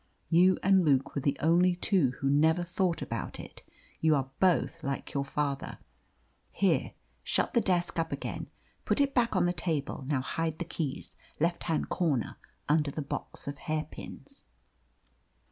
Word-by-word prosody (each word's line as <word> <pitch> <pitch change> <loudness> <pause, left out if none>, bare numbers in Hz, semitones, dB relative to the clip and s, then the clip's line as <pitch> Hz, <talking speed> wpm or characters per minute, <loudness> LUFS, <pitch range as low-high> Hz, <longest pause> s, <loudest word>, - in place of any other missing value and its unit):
You 180 +2 +5
and 190 -1 +5
Luke 140 -4 +2
were 140 - -2
the 140 0 0
only 175 +3 +4
two 175 - +2
who 135 - -2
never 160 +5 +3
thought 175 0 -1
about - - -4
it. - - -10 0.4
You 160 -1 +4
are 135 -1 -2
both 170 -3 +2
like 140 0 -4
your 140 -1 0
father. 140 0 -2 0.7
Here, - - +1 0.3
shut - - +1
the 235 - +4
desk 175 -3 +1
up 165 +1 -1
again. - - -4 0.4
Put - - +1
it 280 -1 +2
back 235 -4 +2
on 180 -1 +3
the 175 - +1
table. 160 -5 -2
Now 140 -3 +1
hide 160 +3 -2
the 175 - -4
keys 155 -4 -4 0.2
left 170 +3 0
hand 160 -2 -1
corner, 150 -10 0 0.3
under 150 0 +3
the 150 +1 -4
box 140 - -5
of 140 0 -5
hairpins." 155 -2 -6
160 Hz, 160 wpm, -30 LUFS, 145-175 Hz, 0.7 s, You